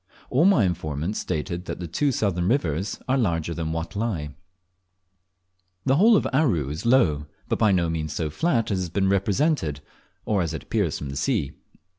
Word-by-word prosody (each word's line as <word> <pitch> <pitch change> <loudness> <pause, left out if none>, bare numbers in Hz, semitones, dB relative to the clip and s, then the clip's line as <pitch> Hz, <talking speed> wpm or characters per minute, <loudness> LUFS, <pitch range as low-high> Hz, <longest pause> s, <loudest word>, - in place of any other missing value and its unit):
All 145 +7 +4
my 190 - +5
informants 85 +1 -2
stated 85 +3 -3
that - - -5
the 90 - -4
two 140 - 0
southern 95 -7 0
rivers 95 - 0
are 130 +1 +2
larger 85 -7 0
than 80 -1 -3
Watelai. 80 -2 -3 1.5
The 135 +1 +3
whole 220 +6 +6
of - - 0
Aru 115 - +2
is 75 +10 -4
low, 80 - +3 0.2
but - - -1
by 110 -3 +4
no 90 -3 +2
means 80 -2 -2
so 75 0 -2
flat 120 - 0
as 95 - 0
it - - -1
has 90 - -3
been 95 +2 +1
represented, 100 - +1 0.5
or 105 -3 +1
as 80 -2 -2
it 80 - -6
appears - - -1
from 70 -2 -6
the - - -6
sea. 70 - 0
90 Hz, 185 wpm, -24 LUFS, 80-115 Hz, 1.5 s, whole